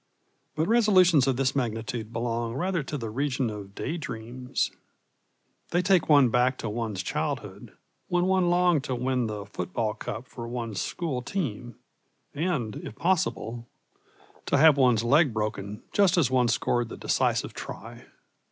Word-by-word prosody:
But 155 +2 0
resolutions 185 - +5
of 130 -2 +1
this 135 0 +1
magnitude 115 -2 -3
belong 115 0 -2
rather 180 +3 0
to 145 +2 -5
the 115 -4 -5
region 130 -1 -1
of 100 -1 -9
day 165 - -3
dreams. 125 -2 -3 1.0
They 175 +1 +1
take 185 -4 +3
one 140 -4 +6
back 125 +2 +2
to 115 - -4
one's 110 -4 -3
childhood, - - -4 0.3
when 175 0 +1
one 185 -1 +2
longed 175 -4 +3
to 130 - -2
win 125 -1 0
the 105 -2 -5
football 100 +3 -3
cup 115 +2 -6
for 120 -2 -8
one's 115 -4 -4
school 150 -8 -3
team, 120 - -4 0.6
and, 145 - -2
if 110 - -8
possible, 120 - -1 0.8
to - - +3
have 155 0 +7
one's 125 -5 +3
leg 140 +2 +4
broken 105 0 -3
just 195 -2 +4
as 140 -7 +3
one 125 -2 +3
scored 120 0 0
the - - -8
decisive - - 0
try. 115 +5 -9
125 Hz, 150 wpm, -27 LUFS, 115-155 Hz, 1.0 s, have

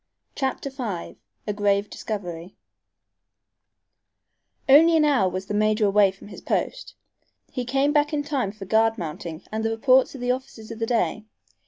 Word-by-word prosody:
CHAPTER 270 0 -3
V 225 -10 -5 0.3
A 210 - -2
GRAVE 205 0 +1
DISCOVERY 180 -5 -6 2.1
Only 325 +5 +7
an 305 - +4
hour 255 -11 +3
was 185 +1 -5
the 210 - -5
major 215 +1 +2
away 200 0 +4
from 195 +2 -12
his - - -10
post. - - -3 0.6
He 250 -2 -3
came 275 +4 +1
back 295 -1 +2
in 295 -1 -1
time 275 -8 -1
for 205 -1 -10
guard 225 +3 +2
mounting 160 -2 -6
and 220 +1 -2
the 225 - +1
reports 255 +4 +3
of 260 - -8
the 245 0 +1
officers 250 -4 -6
of 225 - -8
the 225 - -1
day. 225 -2 0
225 Hz, 165 wpm, -24 LUFS, 200-265 Hz, 2.1 s, Only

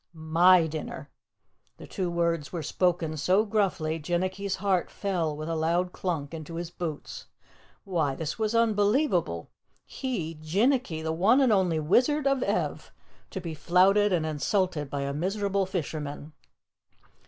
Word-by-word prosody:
"MY 165 +2 +4
dinner." 155 -1 -6 0.7
The - - -10
two 185 -4 -3
words 170 -3 -1
were 170 -3 -4
spoken 170 -1 0
so 185 +8 +3
gruffly, 185 -7 0
Jinnicky's 185 +4 -2
heart 190 -3 0
fell 170 -7 -2
with 155 +1 -5
a 165 - -2
loud 170 +3 0
clunk 165 -6 -3
into 165 0 -7
his 170 0 -5
boots. 160 -5 -6 0.6
Why, 160 -8 -1
this 155 +4 -4
was 220 +1 0
unbelievable! 205 - +1 0.3
He, 215 - -4
Jinnicky, 200 - +1
the 160 0 -1
one 200 +11 +4
and 260 -5 +4
only 180 -5 +2
Wizard 255 - +2
of 275 -2 +2
Ev, - - -2 0.4
to 190 - -5
be 165 -3 -5
flouted 190 +6 +3
and 170 -3 +1
insulted 155 0 -1
by 140 0 -3
a 140 0 -2
miserable 195 +4 -1
fisherman. 155 -4 -5
175 Hz, 140 wpm, -27 LUFS, 160-200 Hz, 0.7 s, MY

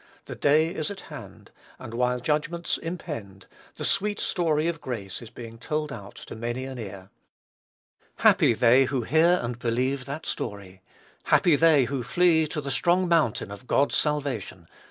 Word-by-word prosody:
The - - -7
day 155 +4 +2
is 155 -5 -3
at 200 -1 -7
hand; - - -11 0.3
and, 115 - -9
while 125 +1 0
judgments 155 +6 -1
impend, 110 - -7 0.3
the - - -4
sweet 210 +1 +1
story 160 -3 0
of 165 -2 -3
grace 110 -8 -5
is 115 - -10
being 115 -1 -10
told 150 +2 -3
out 100 -5 -10
to - - -9
many 120 +3 -4
an 130 -2 -7
ear. 100 -3 -8 1.0
Happy 115 - +4
they 125 +4 +5
who 130 -2 -2
hear 165 +7 +4
and 120 0 -4
believe 130 +3 -1
that 140 +3 -6
story! 100 -4 -5 0.4
Happy 170 -4 +4
they 155 -3 +5
who 135 +1 -3
flee 160 +4 +3
to 150 0 -4
the 140 -1 -4
strong 175 +9 +2
mountain 155 - +1
of 100 +5 -10
God's 140 - +2
salvation! 135 - -2
135 Hz, 165 wpm, -26 LUFS, 115-160 Hz, 1.0 s, they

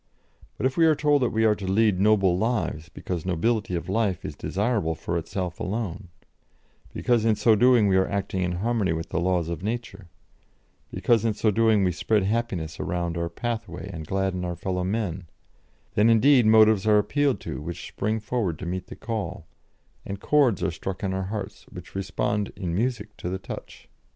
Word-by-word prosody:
But - - -2
if 130 0 0
we 165 -1 +5
are 155 - +4
told 145 -1 +2
that 125 - +2
we 110 0 +1
are 110 - +5
to 100 -2 -6
lead 105 -2 +3
noble 100 -3 +4
lives, 90 -6 -1
because 90 -2 -5
nobility 95 +2 0
of 85 0 -4
life 100 -2 0
is - - -5
desirable 100 -5 -1
for 85 +2 -4
itself 85 +2 -3
alone, 100 -2 -3 0.8
because 120 -3 +1
in 110 -1 +3
so 110 +2 +4
doing 120 -1 +5
we 95 -1 +3
are 95 - +3
acting 100 -2 -2
in 90 -1 0
harmony 105 -1 0
with 80 0 -4
the - - -1
laws 90 -1 +1
of 85 -1 -4
Nature, 105 -3 -5 0.8
because 115 -3 +2
in 110 -2 +1
so 110 0 +2
doing 110 -1 +3
we 90 - +2
spread 105 +4 +1
happiness 95 -7 -2
around 85 -1 -2
our 85 0 -2
pathway 100 -2 -5
and 80 -2 -7
gladden 95 -1 -1
our 90 -1 -3
fellow 90 +1 -2
men 95 -3 -2 0.7
then, 105 +2 +4
indeed, 120 +1 +5
motives 110 -2 +5
are 105 -1 +6
appealed 135 +2 +1
to 95 - -5
which 85 +3 -6
spring 110 +2 -2
forward 105 -6 -2
to 90 - -7
meet 90 +1 -4
the - - -9
call, 105 -7 -4 0.6
and 100 0 -6
chords 135 -6 +2
are - - +1
struck 90 +4 -6
in 95 -1 -1
our 95 0 -2
hearts 100 0 -6
which - - -11
respond 105 +1 -2
in 90 -4 -3
music 110 0 -2
to 85 - -4
the 95 - -2
touch." 95 - -9
100 Hz, 190 wpm, -25 LUFS, 90-110 Hz, 0.8 s, are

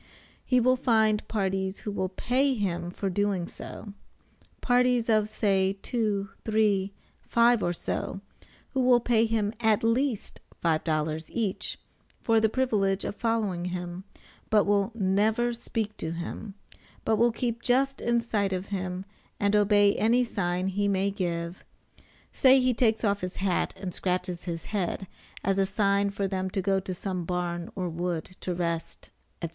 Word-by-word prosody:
He 255 - +3
will 255 +2 +3
find 220 -4 +2
parties 190 -2 -1
who 210 - -4
will 190 -2 -2
pay 260 +7 +1
him 175 -5 -2
for 195 +2 -4
doing 195 -2 0
so. 205 - -9 0.7
Parties 245 -1 +2
of 215 -1 +3
say, 195 -3 +2
two, 210 -5 -1
three, 210 -3 +2 0.3
five 235 -1 +3
or 175 - +1
so, 175 +2 -3 0.5
who 265 - -2
will 250 -1 +5
pay 230 -1 +2
him 220 -2 0
at 220 -2 +2
least 235 0 0 0.3
$5 155 -1 0
each, 215 -5 -2 0.4
for 225 -1 +3
the 220 0 +3
privilege 210 -6 +1
of - - -3
following 215 -7 -1
him, 180 0 -4 0.5
but 210 -2 +5
will 200 +1 +2
never 220 +4 +2
speak 225 -2 -3
to 160 - -4
him; 180 +4 -6 0.5
but 220 - +2
will 235 +2 +4
keep 235 0 -2
just 270 +3 +1
in 235 0 +2
sight 210 -4 0
of 185 +1 -4
him 185 0 -3 0.3
and 205 +1 +2
obey 205 -1 +5
any 235 +3 +3
sign 185 -5 -1
he 200 +2 0
may 200 0 +1
give; 170 -3 -3 0.7
say, 265 -1 +6
he 255 0 +2
takes 225 -2 +2
off 205 -2 +1
his 180 0 -4
hat 190 -2 0
and 185 -2 -5
scratches 180 -1 -2
his 165 -2 -4
head 195 -1 -1 0.4
as 195 0 +1
a 195 - +4
sign 200 0 +2
for 200 0 -2
them 190 -1 -2
to 195 - -2
go 195 0 +2
to 185 -1 -5
some 185 -1 -3
barn 175 0 -3
or 185 -2 -2
wood 170 -1 -2 0.2
to 180 - -2
rest, 170 -1 -3 0.3
&c. 170 - -1
200 Hz, 160 wpm, -27 LUFS, 185-225 Hz, 0.7 s, say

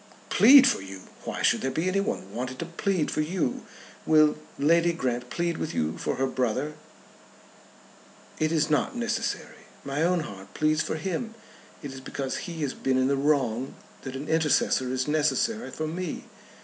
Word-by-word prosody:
"Plead 260 +7 +9
for - - +2
you! 95 0 -9 0.2
Why - - -4
should - - +3
there 135 - 0
be 160 +6 -1
anyone 185 - -1
wanted 130 +1 -4
to 170 - -4
plead 170 0 -1
for 155 - 0
you? 160 -4 -2 0.4
Will 155 -1 +5 0.2
Lady 170 +4 +3
Grant 125 -5 -2
plead 170 -1 -1
with 160 - -3
you 80 0 0
for - - -1
her 135 +1 0
brother?" 130 +3 -1 1.7
"It 155 0 +1
is 155 -2 +2
not 150 +9 +1
necessary. 235 -1 -3 0.2
My 140 +2 -2
own 175 +1 +2
heart 95 -9 -10
pleads 155 0 +2
for - - -2
him. 195 +8 -3 0.5
It 140 -2 -6
is 135 - -9
because 135 +5 -4
he 165 -2 -4
has 140 - -1
been 130 -1 0
in 130 +1 +2
the 140 - +2
wrong 135 -3 0 0.3
that 135 0 -7
an 140 +3 -5
intercessor 150 -5 +2
is 130 +1 -1
necessary 155 +10 +1
for 155 - -4
me. 170 +1 -4
150 Hz, 175 wpm, -27 LUFS, 130-170 Hz, 1.7 s, Plead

